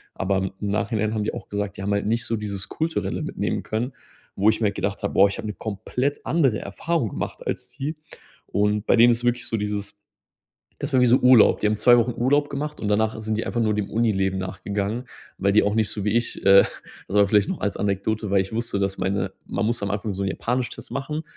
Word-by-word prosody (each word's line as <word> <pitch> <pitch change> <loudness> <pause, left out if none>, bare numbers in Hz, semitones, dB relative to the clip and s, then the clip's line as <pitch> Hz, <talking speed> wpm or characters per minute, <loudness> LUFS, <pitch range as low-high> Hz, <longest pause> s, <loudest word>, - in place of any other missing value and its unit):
Aber 95 0 0
im 95 0 -2 0.2
Nachhinein 110 0 0
haben 110 -1 -1
die - - -2
auch - - -7
gesagt, 100 -1 -4
die 100 - -5
haben 100 +1 0
halt 100 0 0
nicht 115 +1 0
so 115 - -1
dieses 100 -3 -4
Kulturelle 160 +1 -2
mitnehmen - - -2
können, 120 +5 -3 0.4
wo 105 +3 +4
ich 110 - 0
mir - - +2
halt 100 -1 0
gedacht 100 0 -3
habe: 100 - -1
„Boah, 100 - +6
ich 100 - -5
habe 110 -2 -5
'ne 105 - -3
komplett 115 +8 -3
andere 135 -10 +2
Erfahrung 125 - -2
gemacht, - - -5
als - - -3
die.“ 145 +3 -4 0.5
Und 105 +1 0
bei - - +4
denen 120 +1 +7
ist 115 - +2
es - - -6
wirklich 120 0 0
so 115 - -1
dieses, 105 0 -3 0.8
das 145 +1 -4
war 130 - +4
wie 125 - +5
so 120 - +6
Urlaub. 125 -3 +6
Die - - +1
haben 105 +1 +2
2 120 +3 +6
Wochen 120 0 +1
Urlaub 145 +3 +3
gemacht 150 +2 -4
und 105 - -3
danach 110 +1 +1
sind 110 0 -2
die 110 - -2
einfach 120 - -2
nur 110 -2 +2
dem 105 -2 -2
Unileben 95 -4 +1
nachgegangen, 100 +5 -3 0.3
weil 100 +1 +1
die 105 - +5
auch 105 +1 +1
nicht 110 -2 +2
so 105 - -4
wie 105 +2 +1
ich, 120 0 -2
äh 100 0 +8 0.4
das 100 0 +3
vielleicht 105 -1 +3
noch - - -3
als 100 - -1
Anekdote, 105 +1 -1
weil 100 -1 +4
ich 95 +2 -4
wusste, 115 -2 -2
dass 100 -1 -1
meine 95 +1 -1
man 105 - -1
muss 115 -2 -1
am 100 - -1
Anfang 100 0 -2
so 100 +1 -4
'n 95 - 0
Japanisch-Test 125 +6 -3
machen. 150 +3 -3
105 Hz, 240 wpm, -24 LUFS, 100-120 Hz, 0.8 s, äh